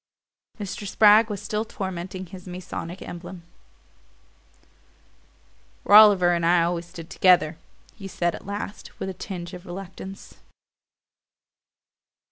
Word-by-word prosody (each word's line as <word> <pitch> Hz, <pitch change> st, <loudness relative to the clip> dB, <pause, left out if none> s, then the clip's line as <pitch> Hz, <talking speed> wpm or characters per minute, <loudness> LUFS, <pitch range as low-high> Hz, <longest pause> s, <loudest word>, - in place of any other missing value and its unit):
Mr. 205 Hz, 0 st, -5 dB
Spragg 215 Hz, +2 st, +5 dB
was 205 Hz, -2 st, -4 dB
still 215 Hz, 0 st, -2 dB
tormenting 190 Hz, -2 st, -6 dB
his 185 Hz, +1 st, -12 dB
Masonic 180 Hz, 0 st, -7 dB
emblem. 175 Hz, 0 st, -9 dB, 2.4 s
"Rolliver 205 Hz, -4 st, +7 dB
and 170 Hz, -1 st, -1 dB
I 170 Hz, 0 st, +4 dB
always 170 Hz, 0 st, -2 dB
stood 170 Hz, -2 st, -10 dB
together," 175 Hz, -3 st, +3 dB, 0.4 s
he 195 Hz, -3 st, -9 dB
said 175 Hz, -2 st, -1 dB
at -, -, -10 dB
last, 200 Hz, 0 st, -7 dB
with 190 Hz, -, -3 dB
a -, -, -5 dB
tinge 175 Hz, -2 st, -7 dB
of 180 Hz, -1 st, -9 dB
reluctance. 190 Hz, +1 st, -9 dB
185 Hz, 110 wpm, -24 LUFS, 175-200 Hz, 2.4 s, Rolliver